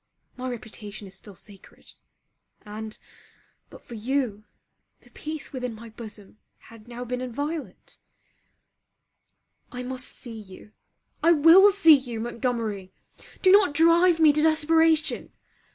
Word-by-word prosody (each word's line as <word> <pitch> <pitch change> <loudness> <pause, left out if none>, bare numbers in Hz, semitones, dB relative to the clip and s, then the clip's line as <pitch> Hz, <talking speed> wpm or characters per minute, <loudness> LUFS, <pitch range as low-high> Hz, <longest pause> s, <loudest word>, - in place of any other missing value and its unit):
My 255 0 -5
reputation 215 -3 -8
is 190 - -11
still 195 +1 -11
sacred: 195 +1 -15 0.7
and, 215 +1 -8 0.7
but - - -15
for - - -12
you, 230 -2 -2 0.6
the - - -23
peace 310 -2 -7
within 250 -3 -4
my 230 +1 -11
bosom 215 -2 -11 0.2
had 225 -1 -17
now 245 +1 -7
been 250 +1 -4
inviolate. 285 +5 -6 1.7
I 250 0 -6
must 255 0 -4
see 230 -3 -8
you, 195 +1 -14 0.5
I 335 - +5
will 335 +6 +7
see 355 -6 +6
you, 245 -5 -5
Montgomery! 230 -5 -3 0.5
Do 375 - +6
not 390 -7 +5
drive 335 +2 +4
me 310 -2 +6
to 300 - +1
desperation! 320 0 +2
250 Hz, 125 wpm, -25 LUFS, 220-315 Hz, 1.7 s, will